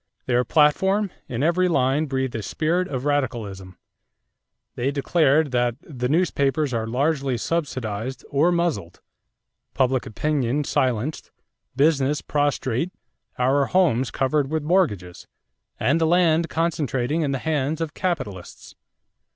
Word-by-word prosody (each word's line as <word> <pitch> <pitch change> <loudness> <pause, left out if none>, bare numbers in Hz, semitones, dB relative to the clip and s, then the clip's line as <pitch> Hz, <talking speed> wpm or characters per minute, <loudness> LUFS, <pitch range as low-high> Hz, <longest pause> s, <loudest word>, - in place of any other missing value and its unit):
Their 125 0 +2
platform, 190 - +2 0.2
in 125 +2 -3
every 175 +3 +3
line, 140 -1 +1
breathed 130 -2 -2
a 115 - -3
spirit 170 - -1
of 130 -1 -4
radicalism. 110 -10 -2 1.0
They 125 +3 -1
declared 145 0 +2
that 120 -1 +1
"the 125 -5 -4
newspapers 150 -4 +1
are 110 -1 -1
largely 135 +1 0
subsidized 130 -4 -3
or 150 +5 +3
muzzled; 170 - -1 0.8
public 130 -1 +1
opinion 145 +2 -1
silenced; 130 +2 -1 0.5
business 145 0 +2
prostrate; 145 +1 0 0.5
our 135 +2 +2
homes 145 -10 +2
covered 135 +1 0
with 155 0 -1
mortgages; 105 - 0 0.5
and 165 +5 +2
the 160 - +3
land 170 -1 +3
concentrating 155 -3 -1
in 150 - 0
the 135 - 0
hands 150 +1 -1
of 165 -2 -3
capitalists.... 130 - -4
140 Hz, 120 wpm, -23 LUFS, 125-160 Hz, 1.0 s, every